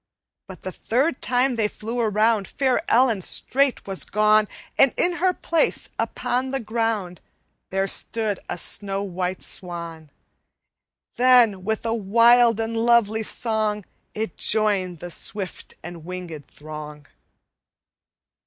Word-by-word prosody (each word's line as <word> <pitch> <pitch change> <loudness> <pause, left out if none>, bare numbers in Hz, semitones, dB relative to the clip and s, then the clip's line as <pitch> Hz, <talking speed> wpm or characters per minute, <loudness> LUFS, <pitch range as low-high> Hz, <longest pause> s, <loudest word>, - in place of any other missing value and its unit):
"But 190 - -11
the 185 - -4
third 260 - -1
time 250 0 +1
they 215 -2 +2
flew 225 +3 -6
around, 215 -1 +2
Fair 270 0 0
Ellen 235 -4 +3
straight 275 +8 +1
was 195 -2 -2
gone, 215 0 +3 0.3
And 270 -2 +4
in 350 0 +3
her 370 +1 +2
place, 335 -2 -1
upon 255 +2 -1
the 270 0 -2
ground, 220 -6 -2 0.5
There 195 0 0
stood 210 0 0
a - - -3
snow 195 +2 -1
white 185 -1 -3
swan. 170 -3 -6 1.1
Then, 240 -6 +5
with 220 +3 -2
a 225 - 0
wild 230 +2 +4
and 225 0 -2
lovely 225 -1 +3
song, 215 -2 0 0.3
It 215 -5 -4
joined 200 -6 0
the 175 - -7
swift 195 +1 -3
and 170 -2 -9
winged 175 -4 -7
throng. 150 -1 -10
215 Hz, 125 wpm, -23 LUFS, 185-235 Hz, 1.1 s, Then